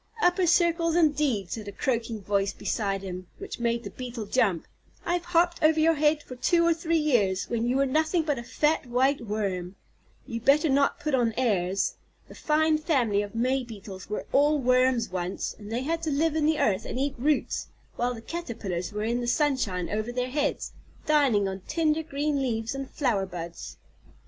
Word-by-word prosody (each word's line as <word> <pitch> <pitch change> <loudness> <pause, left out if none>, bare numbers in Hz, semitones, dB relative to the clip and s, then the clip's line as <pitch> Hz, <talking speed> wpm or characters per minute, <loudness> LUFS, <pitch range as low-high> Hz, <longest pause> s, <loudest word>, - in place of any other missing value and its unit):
"Upper 360 -3 +3
circles, 335 -1 +3
indeed!" 290 - +2
said 215 -2 -5
a - - -4
croaking 230 -1 -2
voice 200 0 0
beside 195 -3 -2
him, 180 -1 -6
which 400 -7 -7
made 235 0 0
the - - -7
Beetle 245 -3 -6
jump, 200 -6 +1 0.4
"I 345 - 0
have 350 -1 -1
hopped 345 0 +2
over 315 0 +4
your 325 +1 +5
head 300 0 +2
for 255 - -9
two 335 +7 +2
or 335 - +4
three 330 0 0
years, 205 - +1
when 235 0 0
you 250 +2 +1
were 275 - +3
nothing 315 +5 +1
but 295 -5 -1
a - - -6
fat, 300 +3 0
white 260 +3 +2
worm. 200 -4 -3 0.5
You'd 230 -3 -5
better 295 +4 +4
not 280 +1 +2
put 300 -1 -2
on 235 -4 +2
airs. 195 -6 0 0.3
The - - -12
fine 310 0 +2
family 245 - +1
of 205 +1 -7
May 255 +3 +1
Beetles 200 -5 -10
were 210 - -3
all 295 +2 +4
worms 255 -3 +2
once, 180 0 -3
and 210 0 -9
they 235 +2 -1
had 330 +3 -1
to 325 - -2
live 310 +2 +1
in 305 -1 +2
the 315 -1 +2
earth 190 -3 +1
and - - -5
eat 280 0 0
roots, 295 +4 0 0.3
while 245 +1 -1
the 225 - -9
Caterpillars 220 - -4
were 210 0 -3
in 235 +2 0
the 240 - -3
sunshine 240 - 0
over 215 +3 -2
their 250 +1 -2
heads, 290 +1 -1 0.3
dining 275 -10 +3
on 190 0 -4
tender 315 0 +1
green 295 -2 -1
leaves 225 -3 -1
and 275 -1 -5
flower 220 -9 0
buds." 170 -2 -7
255 Hz, 195 wpm, -27 LUFS, 210-305 Hz, 0.5 s, your